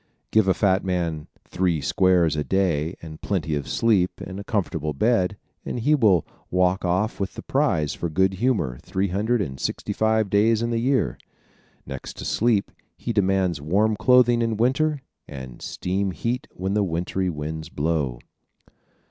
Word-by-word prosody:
Give 110 -3 +4
a 95 - +3
fat 95 -2 +2
man 85 -5 -2 0.2
"three 90 -3 0
squares" 85 +2 +3
a 75 - -1
day 85 -3 0
and 80 -1 -9
plenty 80 -6 -1
of 70 -2 -2
sleep 100 -6 +1
in 95 +1 -7
a - - -6
comfortable 85 -9 -2
bed, 105 - +1 0.3
and - - -4
he 145 +7 +2
will 105 - +4 0.2
walk 90 +1 +2
off 95 +5 0
with 100 - -3
the - - -7
prize 75 -2 +1
for 85 - -3
good 95 +4 +2
humor 85 - 0
three 95 +1 -1
hundred 105 +4 +1
and 65 -6 -7
sixty - - -3
five 110 -2 +1
days 110 +2 +3
in 120 - -1
the 115 - 0
year. 125 - +1 0.7
Next 65 -2 -7
to - - -6
sleep 110 -3 +1 0.3
he - - -3
demands 95 -5 +1
warm 100 +8 +2
clothing 120 +1 +4
in 115 -2 0
winter 140 +5 +1 0.2
and 65 -3 -9
steam 95 +2 -2
heat 120 +7 -3
when 95 +2 -3
the 105 - +2
wintry 90 +1 -1
winds 80 0 -5
blow. 70 -5 -1
95 Hz, 165 wpm, -24 LUFS, 80-110 Hz, 0.7 s, Give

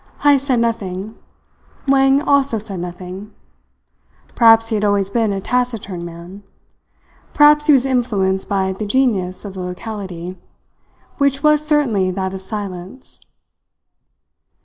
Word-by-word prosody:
Heyst 280 -1 +4
said 255 -3 +2
nothing. 215 -3 -3 0.7
Wang 270 +1 +4
also 280 -5 +2
said 200 -3 -5
nothing. 180 +3 -8 1.0
Perhaps 225 -1 +5
he - - -2
had 210 - -1
always 200 -1 +1
been 225 -2 +1
a 195 - -2
taciturn 225 -6 -2
man; 170 +3 -10 0.9
perhaps 295 +1 +5
he 300 - +7
was 265 -1 +3
influenced 210 -8 0
by 190 -1 0
the 210 +2 -5
genius 205 -7 0
of 200 - -7
the 190 - -8
locality, 180 -1 -7 0.8
which 280 -1 +1
was 300 0 +4
certainly 270 -11 +1
that 190 0 -3
of 190 - -6
silence. 195 +3 -8
210 Hz, 125 wpm, -18 LUFS, 190-260 Hz, 1.0 s, he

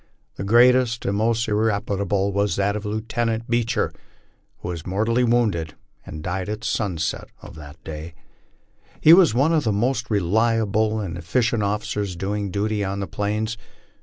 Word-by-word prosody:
The - - -6
greatest 120 +2 +4
and 100 - 0
most 115 +2 +1
irreparable 100 -2 0
was 100 +1 +1
that 100 +1 0
of 105 0 -4
Lieutenant 115 +2 -2
Beecher, 120 -1 0 0.6
who - - -7
was 85 -3 -5
mor 95 +5 -1
tally 115 +2 +2
wounded, 110 -10 +1 0.3
and 75 - -7
died 95 +2 -3
at 105 +1 -5
sunset 90 -9 -2
of - - -10
that 75 +1 -12
day, 80 +1 -8 0.8
He 160 - +8
was 170 - +6
one 145 +6 +3
of 155 -2 +2
the 110 - +1
most 115 +3 0
relia 110 +3 +2
ble 110 0 0
nd 85 0 -6
efficient 115 +7 0
officers 105 -1 -2
doing 100 +2 -3
duty 105 +2 -1
on 100 0 -3
the 100 - -2
Plains. 105 +5 -2
105 Hz, 165 wpm, -23 LUFS, 95-115 Hz, 0.8 s, He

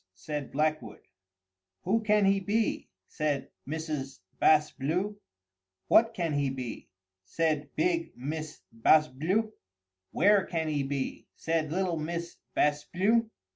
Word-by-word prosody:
said 150 +2 -5
Blackwood. 155 +2 -1 0.8
"Who 220 +5 +2
can 210 -2 +3
he 195 0 +4
be?" 210 +3 -1 0.2
said 145 -3 -2 0.2
Mrs. 150 -3 -4 0.2
Bas 155 -1 +5
Bleu. 180 +9 -2 0.7
"What 230 0 +5
can 170 -4 -1
he 140 -1 +1
be?" 130 -3 -6 0.3
said 150 - -1
big 335 0 +1
Miss 155 +4 -5
Bas 150 +7 +4
Bleu. 185 +11 -1 0.6
"Where 205 -1 +4
can 165 -2 -2
he 145 -2 0
be?" 135 -1 -3
said 160 -2 -1
little 180 -1 0
Miss 170 +2 -4 0.2
Bas 150 0 +2
Bleu. 220 +5 +2
160 Hz, 125 wpm, -29 LUFS, 145-195 Hz, 0.8 s, Bas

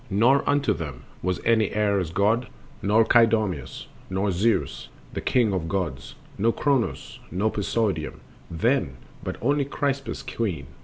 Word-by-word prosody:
Nor 120 +8 +4
unto 145 -1 +3
them 75 -6 -6 0.2
Was 90 0 -1
any 110 -3 +3
Ares 100 -5 +1
god, 110 +7 +1 0.3
nor 110 +3 +4
Kydoimos, 110 -5 +2 0.2
Nor 95 +2 0
Zeus, 95 - 0 0.2
the - - -3
king 120 -6 +2
of 85 -3 -2
gods, 80 -9 -3 0.2
nor 115 +4 +3
Kronos, 125 - -1
nor 105 +4 0
Poseidon 100 -6 -1 0.3
then, 85 - 0 0.3
but - - -3
only 140 +3 +2
Kypris 140 -1 -2
queen... 90 - -3
105 Hz, 135 wpm, -25 LUFS, 90-115 Hz, 0.3 s, Nor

